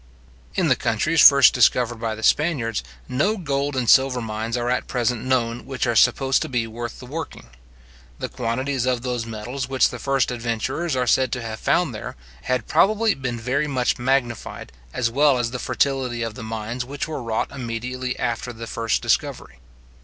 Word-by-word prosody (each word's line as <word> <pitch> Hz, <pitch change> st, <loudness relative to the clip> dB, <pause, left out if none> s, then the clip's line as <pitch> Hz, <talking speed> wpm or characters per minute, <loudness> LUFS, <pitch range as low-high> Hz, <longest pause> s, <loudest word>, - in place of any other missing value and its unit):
In -, -, +2 dB
the -, -, +4 dB
countries 165 Hz, 0 st, +1 dB
first 140 Hz, -2 st, +8 dB
discovered 120 Hz, -1 st, +3 dB
by 110 Hz, -1 st, -2 dB
the 110 Hz, -, -9 dB
Spaniards, 135 Hz, -9 st, +1 dB, 0.2 s
no 200 Hz, +12 st, +1 dB
gold 140 Hz, -4 st, -2 dB
and 125 Hz, -2 st, -1 dB
silver 130 Hz, +1 st, +5 dB
mines 110 Hz, +1 st, -3 dB
are 120 Hz, 0 st, -2 dB
at 125 Hz, +1 st, 0 dB
present 120 Hz, -2 st, -1 dB
known 120 Hz, -2 st, -1 dB
which 135 Hz, -1 st, -2 dB
are 120 Hz, -1 st, 0 dB
supposed 135 Hz, +4 st, +3 dB
to -, -, -3 dB
be 120 Hz, -3 st, 0 dB
worth 115 Hz, +1 st, -6 dB
the 125 Hz, -, -10 dB
working. 140 Hz, -, -7 dB, 0.7 s
The -, -, -4 dB
quantities 130 Hz, +2 st, -2 dB
of 125 Hz, -2 st, 0 dB
those 120 Hz, -3 st, -2 dB
metals 120 Hz, +4 st, -5 dB
which 130 Hz, -2 st, +3 dB
the 125 Hz, -, -7 dB
first 135 Hz, -1 st, +1 dB
adventurers 120 Hz, +7 st, -2 dB
are 125 Hz, -1 st, +1 dB
said 130 Hz, +1 st, +2 dB
to 125 Hz, -2 st, -3 dB
have 110 Hz, -1 st, -5 dB
found 140 Hz, 0 st, +1 dB
there, 110 Hz, -, -7 dB, 0.3 s
had 130 Hz, -3 st, 0 dB
probably 215 Hz, +2 st, +3 dB
been 130 Hz, -3 st, -4 dB
very 130 Hz, +6 st, 0 dB
much 130 Hz, -4 st, 0 dB
magnified, 125 Hz, -2 st, -1 dB, 0.2 s
as 115 Hz, -, -1 dB
well 140 Hz, +1 st, +4 dB
as 120 Hz, -1 st, -1 dB
the 125 Hz, -, -4 dB
fertility 130 Hz, -2 st, 0 dB
of 115 Hz, -1 st, -4 dB
the 125 Hz, -, -9 dB
mines 115 Hz, +2 st, -4 dB
which 140 Hz, +4 st, -5 dB
were 155 Hz, -4 st, -4 dB
wrought 115 Hz, -2 st, -2 dB
immediately 125 Hz, 0 st, -4 dB
after 120 Hz, +1 st, -2 dB
the 115 Hz, 0 st, -8 dB
first 115 Hz, -1 st, -1 dB
discovery. -, -, -1 dB
125 Hz, 185 wpm, -23 LUFS, 115-135 Hz, 0.7 s, first